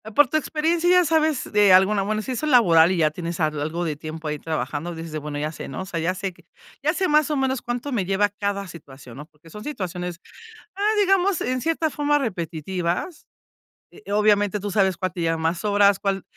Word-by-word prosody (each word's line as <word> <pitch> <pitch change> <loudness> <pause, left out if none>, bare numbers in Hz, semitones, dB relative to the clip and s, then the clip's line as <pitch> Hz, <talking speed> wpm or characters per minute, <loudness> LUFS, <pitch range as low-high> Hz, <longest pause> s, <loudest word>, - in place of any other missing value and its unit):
por 290 -3 +6
tu 310 - 0
experiencia, 325 +3 0
ya 360 0 +6
sabes, 315 -3 +1
de 205 -3 +5
alguna 195 +2 +4
bueno, 215 +1 -1
si 260 - -5
eso 305 - -3
es 300 - 0
laboral, 170 -9 +6
y 185 - 0
ya 155 -2 +3
tienes 170 +1 -5
al 155 -2 0
algo 160 +4 -3
de 155 -3 -2
tiempo, 155 +1 -7
ahí 150 0 -2
trabajando, 155 +2 -4
dices 165 -1 -8
de: 155 - -4
"Bueno, 145 -1 -5
ya 150 +1 -2
sé", - - -8
¿no? 135 - -6
O - - -5
sea, 170 -3 -4
ya 170 +3 0
sé 190 0 -4
que 175 -1 -23 0.4
ya 310 +3 +2
sé 370 +2 0
más 300 0 +3
o - - +1
menos, 265 -1 0
cuánto 240 +4 -4
me 210 -8 -1
lleva 195 +2 +1
cada 200 -1 -3
situación, 135 -7 -12
¿no? 150 - -8
Porque 155 +1 -21
son 210 +5 -10
situaciones, 180 - -5 0.6
ah, 410 +2 +1
digamos, 390 -2 +2
en 255 0 -1
cierta 325 -1 0
forma, 295 0 +1
repetitivas. 180 - -3 0.7
Eh, 200 - -11
obviamente, 205 -1 +2
tú 205 0 -4
sabes 190 -3 +2
cuál 185 -1 -3
te 175 - -5
lleva 165 0 0
más 165 +3 -2
horas, 205 -1 +3
cuál 195 -1 -1
195 Hz, 225 wpm, -23 LUFS, 165-255 Hz, 0.7 s, por